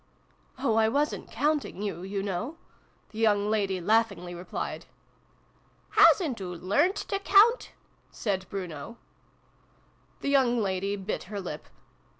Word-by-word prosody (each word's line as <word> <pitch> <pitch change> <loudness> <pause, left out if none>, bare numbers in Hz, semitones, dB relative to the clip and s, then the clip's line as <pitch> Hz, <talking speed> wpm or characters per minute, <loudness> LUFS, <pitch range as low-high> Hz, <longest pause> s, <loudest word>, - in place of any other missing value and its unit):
Oh, 240 -4 +1
I 220 0 +4
wasn't 290 +5 -1
counting 290 -5 -1
you, 200 -4 -3
you 195 +1 -3
know! 205 - -3 0.3
" - - -37
the 220 - -8
young 210 -2 +2
lady 200 -3 0
laughingly 200 -2 +1
replied. 175 +1 -5 0.6
" - - -36 0.2
Hasn't 285 - +5
oo 180 -1 -5
learnt 245 - +1
to 395 - -3
count? 420 +5 +4 0.2
" - - -38
said 190 -4 -3
Bruno. 180 +2 -6 1.2
The - - -1
young 260 -4 +3
lady 195 -1 -1
bit 195 +1 -4
her 200 +2 -5
lip. 165 -5 -7
205 Hz, 140 wpm, -28 LUFS, 190-260 Hz, 1.2 s, Hasn't